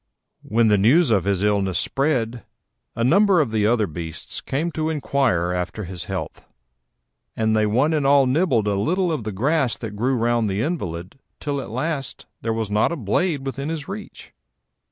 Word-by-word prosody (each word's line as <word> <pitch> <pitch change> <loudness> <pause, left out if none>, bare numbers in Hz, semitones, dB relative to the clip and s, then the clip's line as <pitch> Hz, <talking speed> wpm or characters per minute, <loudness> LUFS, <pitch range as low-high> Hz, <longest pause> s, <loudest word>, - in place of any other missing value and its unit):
When 115 +1 +2
the 105 -2 +4
news 130 - +4
of 100 -6 +2
his 100 -1 0
illness 100 -3 +1
spread, 125 -5 0 0.5
a 115 - -1
number 190 - +4
of 140 -7 +1
the 105 -2 +2
other 115 -2 +2
beasts 80 -2 -6
came 160 +6 -2
to 155 0 -2
inquire 130 - 0
after 90 +4 -3
his 90 -1 -6
health, - - -5 0.9
and 110 0 +1
they 110 -1 +3
one 130 +9 +2
and 150 -2 +1
all 140 -1 +5
nibbled 130 - +2
a 105 - +2
little 175 - +1
of 150 -9 -3
the 110 - -2
grass 135 +5 +1
that 110 -3 -6
grew 125 +5 +1
round 115 -2 +1
the 100 +2 -1
invalid 95 - -4 0.2
till 145 -2 -2
at - - -8
last 135 +3 -3 0.2
there 115 - -3
was 110 -2 -2
not 105 +8 +2
a - - -1
blade 140 - -1
within 135 +2 -4
his 160 -3 -4
reach. 205 +2 -9
120 Hz, 185 wpm, -22 LUFS, 105-150 Hz, 0.9 s, all